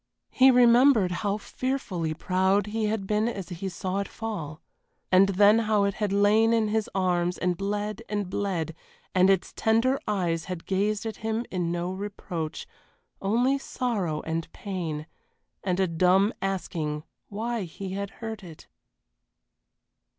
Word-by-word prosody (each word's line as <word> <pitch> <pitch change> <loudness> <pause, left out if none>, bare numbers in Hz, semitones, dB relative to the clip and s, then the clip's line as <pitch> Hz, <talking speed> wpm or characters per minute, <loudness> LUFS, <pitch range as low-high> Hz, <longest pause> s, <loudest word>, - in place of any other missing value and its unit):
He 265 +1 +6
remembered 245 -4 +6
how 200 +3 -1
fearfully 195 -10 -3
proud 190 +3 +2
he 215 +1 -2
had 210 -2 -1
been 210 +2 +1
as 195 -7 -4
he 185 +2 -4
saw 190 +1 -3
it 200 - -2
fall, 175 -9 -5 0.5
and 190 +1 +6
then 205 +3 +5
how 215 -2 +2
it 200 0 +1
had 210 -1 -2
lain 210 +3 +4
in 220 -2 +2
his 220 0 0
arms 180 -2 +1
and 180 -1 0
bled 205 +3 -3
and 205 -2 -1
bled, 180 -4 -2 0.4
and 185 +1 +5
its 190 -2 +1
tender 230 +5 +2
eyes 170 -5 0
had 180 -3 -6
gazed 200 +2 0
at 220 -2 -4
him 225 +2 -2
in 175 -2 -1
no 175 +1 -2
reproach, 185 -5 -5 0.6
only 245 +7 +2
sorrow 205 - -2
and 165 0 -3
pain, 170 -6 -4 0.6
and 185 -1 0
a 190 - +4
dumb 185 +5 +3
asking 160 -6 -2 0.3
why 225 +3 -2
he 185 +3 -7
had 200 +1 -3 0.2
hurt 220 -2 -5
it. 165 -4 -12
195 Hz, 150 wpm, -27 LUFS, 180-215 Hz, 0.6 s, He